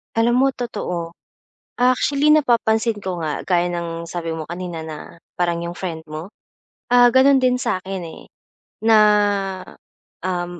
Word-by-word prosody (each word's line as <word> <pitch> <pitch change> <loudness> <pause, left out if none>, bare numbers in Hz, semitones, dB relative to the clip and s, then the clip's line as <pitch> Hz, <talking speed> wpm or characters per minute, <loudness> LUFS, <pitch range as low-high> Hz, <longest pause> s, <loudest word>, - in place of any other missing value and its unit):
Alam 240 +3 +3
mo - - +4
totoo. 180 -9 -5 0.6
Actually 275 +4 +3
napapansin 230 -6 +2
ko 185 -4 -5
nga, 155 -2 -3
gaya 175 -1 +1
ng 170 -1 -5
sabi 165 -1 -4
mo 160 -1 -6
kanina, 175 -1 -5
na 160 -1 -7 0.4
parang 175 -1 0
'yong 170 +1 -6
friend 170 -4 -5
mo. 155 +6 -8 0.5
Ah, 245 0 +6
gano'n 265 +1 +5
din 250 0 +3
sa 185 -7 -2
'kin, 190 -1 -5
eh, 160 - -11 0.6
na, 225 0 +5 1.2
um, 175 -1 -4
185 Hz, 140 wpm, -20 LUFS, 170-240 Hz, 1.2 s, Ah